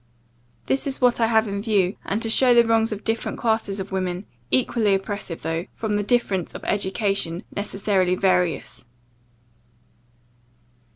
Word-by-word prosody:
This 270 +1 0
is 270 - -2
what 245 -2 +3
I 225 - +4
have 220 -1 +3
in 200 0 -3
view; 200 -4 +1
and 210 +4 -1
to 225 - -1
show 250 +1 +5
the 235 0 +6
wrongs 225 0 +2
of 210 0 -5
different 225 0 -2
classes 220 -4 0
of 190 +1 -6
women, 185 0 -2 0.2
equally 200 - +2
oppressive, 195 -3 -5
though, 165 +3 -2
from 220 -2 -2
the 205 - +1
difference 205 -5 0
of - - -8
education, 195 -3 0
necessarily 195 -2 0
various. 180 -3 0
205 Hz, 150 wpm, -23 LUFS, 190-225 Hz, 0.2 s, the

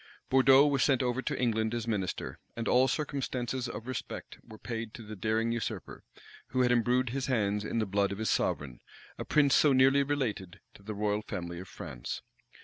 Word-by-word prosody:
Bourdeaux 135 +1 +7
was 140 -3 +2
sent 135 -2 +3
over 125 +1 0
to 140 0 -3
England 110 -2 +1
as 120 -1 -3
minister; 100 -5 -3 0.2
and 115 0 -3
all 130 +1 +5
circumstances 130 -4 -2
of 115 - -7
respect 130 -3 -6
were 110 - -12
paid 115 -1 -5
to 115 - -9
the 110 0 -8
daring 110 +3 0
usurper, 115 -2 -4 0.4
who 130 - 0
had 125 -1 +3
imbrued 125 +1 +2
his 135 +1 -2
hands 105 -5 +1
in 110 - -3
the 110 - +1
blood 100 0 +1
of 100 - -4
his 110 +1 0
sovereign, 65 -4 -1 0.4
a - - -4
prince 145 -3 +3
so 145 -3 +5
nearly 135 +2 +5
related 125 -10 -2
to - - -16
the 105 +1 -6
royal 105 0 0
family 85 -5 -5
of 95 - -9
France. - - -7
115 Hz, 195 wpm, -30 LUFS, 105-130 Hz, 0.4 s, Bourdeaux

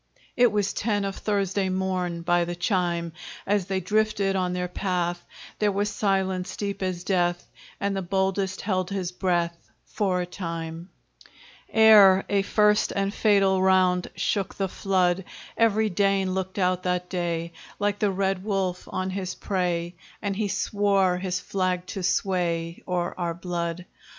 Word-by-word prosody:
It 245 -2 +5
was 205 -1 0
ten 205 -2 0
of 195 -1 -3
Thursday 200 -2 0
morn, 185 -2 -2
By 175 0 +3
the 175 0 -4
chime; 175 -2 -1 0.3
As 200 -2 +1
they 190 -1 0
drifted 205 0 +1
on 180 -1 0
their 180 0 -2
path 175 -2 -2 0.4
There 210 -1 +2
was 205 +1 -1
silence 190 -3 -1
deep 200 -1 -3
as 185 -2 -2
death, 175 -2 0 0.3
And 200 0 -1
the 195 - -1
boldest 190 +1 -1
held 185 -3 -1
his 190 -3 -3
breath 175 -2 -1 0.2
For 190 -4 -1
a - - -2
time 165 -1 -6 0.8
Ere 210 -4 +7
a 200 -1 +3
first 210 +1 +3
and 200 0 -1
fatal 195 -4 +3
round 185 -1 +3
Shook 190 +2 -1
the 195 - -1
flood; 185 -1 +1 0.3
Every 220 -1 +2
Dane 195 0 +1
looked 190 0 -3
out 185 -1 +1
that 180 0 -1
day, 170 -2 -2 0.2
Like 205 0 0
the 210 - +2
red 195 -1 -1
wolf 190 -3 -2
on 185 0 -2
his 185 -1 -4
prey, 175 -3 -1 0.3
And 200 -1 -2
he 210 +1 -1
swore 195 -2 +1
his 185 -1 -2
flag 185 -1 -1
to 195 - -4
sway 175 -3 0
O'er 180 -1 -1
our 170 -1 -1
blood. 175 0 -4
185 Hz, 155 wpm, -25 LUFS, 180-200 Hz, 0.8 s, Ere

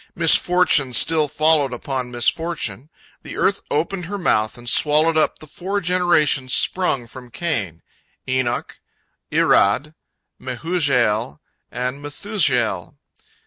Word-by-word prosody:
Misfortune 165 -5 +3
still 155 +5 +4
followed 150 -2 +1
upon 125 0 -4
misfortune. 130 - -2 0.3
The - - -9
earth 200 0 0
opened 170 +4 -2
her 205 +4 -5
mouth 110 - 0
and 120 0 -11
swallowed 155 +5 +3
up 155 - +1
the - - -13
four 185 +7 -4
generations 170 -8 +1
sprung 180 -9 +1
from 125 +1 -12
Cain—Enoch, 120 - -5 0.5
Irad, 140 +10 +2 0.5
Mehujael, 125 - -1 0.3
and 125 +3 -4
Methushael. 145 - -1
145 Hz, 105 wpm, -20 LUFS, 125-165 Hz, 0.5 s, still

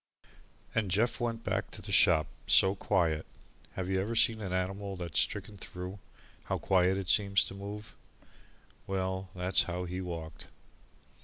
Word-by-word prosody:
And 110 -3 0
Jeff 110 +8 +1
went 115 -2 -2
back - - -1
to - - -9
the - - -7
shop 80 -1 +5 0.2
so 95 0 +6
quiet 85 -6 +1 0.5
have 95 -1 -3
you 95 0 +1
ever 110 +4 -2
seen 110 0 +3
an 95 -3 -4
animal 95 +2 -2
that 85 -3 -6
is - - +3
stricken 105 - -3
through, 90 +1 -7 0.5
how - - -1
quiet 95 0 +3
it 95 -2 -4
seems 100 0 +4
to - - -7
move? 105 +2 -7 0.9
Well, 95 0 -2
that's 90 +1 +3
how 90 +1 -2
he 90 +1 -4
walked. 85 -3 -6
95 Hz, 160 wpm, -31 LUFS, 90-100 Hz, 0.9 s, so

